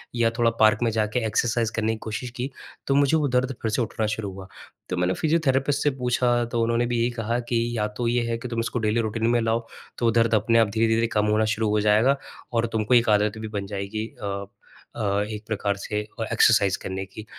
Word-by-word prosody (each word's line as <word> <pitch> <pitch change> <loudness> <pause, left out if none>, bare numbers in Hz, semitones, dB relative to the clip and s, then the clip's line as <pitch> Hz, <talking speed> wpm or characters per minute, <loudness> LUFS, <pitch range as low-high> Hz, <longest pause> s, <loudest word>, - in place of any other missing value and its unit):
या 115 -1 +3
थोड़ा 120 -1 +4
पार्क 110 0 +5
में 115 - +2
जाके 110 +2 0
एक्सरसाइज़ 115 0 0
करने 110 0 0
की - - -5
कोशिश 110 +3 -4
की, 125 +1 -3 0.4
तो 135 - +2
मुझे 140 +2 +4
वो 150 -2 +1
दर्द 130 +1 +2
फ़िर 110 - -1
से 110 - 0
उठना 110 -1 -2
शुरू 105 -3 -4
हुआ। 95 0 -9 0.4
तो 90 - -2
मैंने 90 +1 +1
फ़िजियोथेरेपिस्ट 145 - +1
से 145 - +4
पूछा, 120 -1 +2
तो 115 0 -2
उन्होंने 115 +1 +1
भी 120 0 -1
ये 120 - +1
कहा 115 0 -2
कि 115 -1 +2 0.2
या 105 -1 +1
तो 120 - -1
ये 120 +1 +2
है 115 - -1
कि 115 - -7
तुम 115 -1 -3
इसको 115 +1 -2
डेली 110 +1 +1
रूटीन 110 +1 -1
में 120 0 +3
लाओ, 115 0 -1 0.3
तो 120 - -1
वो 115 - +4
दर्द 115 0 +2
अपने 115 +2 +3
आप 110 -2 +3
धीरे-धीरे 115 +1 +2
कम 105 - +3
होना 110 0 +2
शुरू 110 -1 0
हो 105 0 +2
जाएगा 110 +6 +4 0.4
और 115 0 +2
तुमको 110 +2 +1
एक 120 -2 +5
आदत 105 0 +2
भी 110 0 -5
बन 100 - -3
जाएगी 100 +2 -4
अ 100 -1 -3 0.5
अ, 100 -2 0
एक 105 0 -6
प्रकार 100 -2 -1
से 105 +1 -3 0.2
और 110 - -2
एक्सरसाइज़ 110 -4 +4
करने 95 0 -4
की। 100 +3 -11
115 Hz, 235 wpm, -24 LUFS, 105-120 Hz, 0.5 s, पार्क